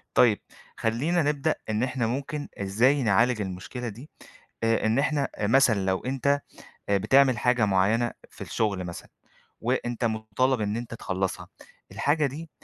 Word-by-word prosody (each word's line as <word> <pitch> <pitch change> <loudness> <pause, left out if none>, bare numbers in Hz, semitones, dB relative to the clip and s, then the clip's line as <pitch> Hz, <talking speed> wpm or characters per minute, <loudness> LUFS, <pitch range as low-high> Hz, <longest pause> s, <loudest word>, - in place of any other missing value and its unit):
طيب. 115 -4 +5 0.4
خلينا 145 +10 +1
نبدأ 150 +1 +1 0.2
إن 110 +1 0
إحنا 125 -2 0
ممكن 140 +4 -3
إزاي 120 +8 +2
نعالج 110 +2 +3
المشكلة 100 +6 -5
دي، 120 +8 -10 0.5
آآ، 115 0 +2
إن 110 +4 +2
إحنا 145 -1 +1
أ 105 - -1
مثلًا 110 -5 +4
لو 95 -1 +1
أنت 140 +2 +1 0.5
آآ، 100 - +3
بتعمل 130 +4 +4
حاجة 125 0 +2
معينة 105 +5 +2 0.2
في - - -18
الشغل 100 -4 -1
مثلًا، 85 -1 -8 0.5
وأنت 120 0 -1
مُطالب 110 +3 0
إن 105 0 -1
أنت 115 0 -5
تخلصها، 95 -4 -3 0.4
الحاجة 150 +1 +1
دي 155 +4 -7
120 Hz, 145 wpm, -26 LUFS, 105-135 Hz, 0.5 s, طيب